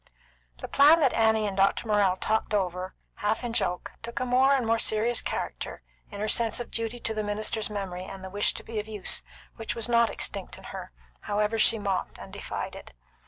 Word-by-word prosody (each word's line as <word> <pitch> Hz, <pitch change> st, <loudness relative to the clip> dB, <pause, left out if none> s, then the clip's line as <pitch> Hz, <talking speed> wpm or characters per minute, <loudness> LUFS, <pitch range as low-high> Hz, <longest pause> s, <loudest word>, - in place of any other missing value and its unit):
The -, -, -2 dB
plan 300 Hz, +4 st, +7 dB
that 270 Hz, -, +4 dB
Annie 220 Hz, -1 st, +3 dB
and 200 Hz, -2 st, -2 dB
Doctor 195 Hz, +4 st, +2 dB
Morrell 205 Hz, -3 st, +3 dB
talked 220 Hz, 0 st, 0 dB
over 185 Hz, -1 st, -1 dB, 0.2 s
half 215 Hz, +3 st, 0 dB
in 240 Hz, -1 st, -3 dB
joke 180 Hz, -5 st, -1 dB
took 235 Hz, 0 st, -5 dB
a -, -, 0 dB
more 260 Hz, +2 st, +4 dB
and 255 Hz, -3 st, 0 dB
more 225 Hz, 0 st, +2 dB
serious 225 Hz, +3 st, +2 dB
character -, -, -4 dB, 0.3 s
in 205 Hz, -, -8 dB
her 215 Hz, -, -1 dB
sense 225 Hz, +1 st, +2 dB
of 240 Hz, -, -6 dB
duty 230 Hz, +1 st, -2 dB
to 220 Hz, -, 0 dB
the 215 Hz, -, -1 dB
minister's 215 Hz, +1 st, -1 dB
memory 190 Hz, -3 st, -4 dB
and 190 Hz, 0 st, -9 dB
the 190 Hz, -, -7 dB
wish 205 Hz, +1 st, +1 dB
to -, -, -6 dB
be 225 Hz, -1 st, -4 dB
of 210 Hz, -, -5 dB
use, 210 Hz, -3 st, 0 dB, 0.4 s
which 225 Hz, 0 st, -3 dB
was 230 Hz, -1 st, -2 dB
not 235 Hz, -1 st, +4 dB
extinct -, -, -4 dB
in -, -, -14 dB
her, -, -, -7 dB, 0.3 s
however 210 Hz, +2 st, 0 dB
she 225 Hz, -, +5 dB
mocked 200 Hz, -3 st, -2 dB
and -, -, -11 dB
defied -, -, -5 dB
it. -, -, -11 dB
215 Hz, 210 wpm, -28 LUFS, 205-230 Hz, 0.4 s, plan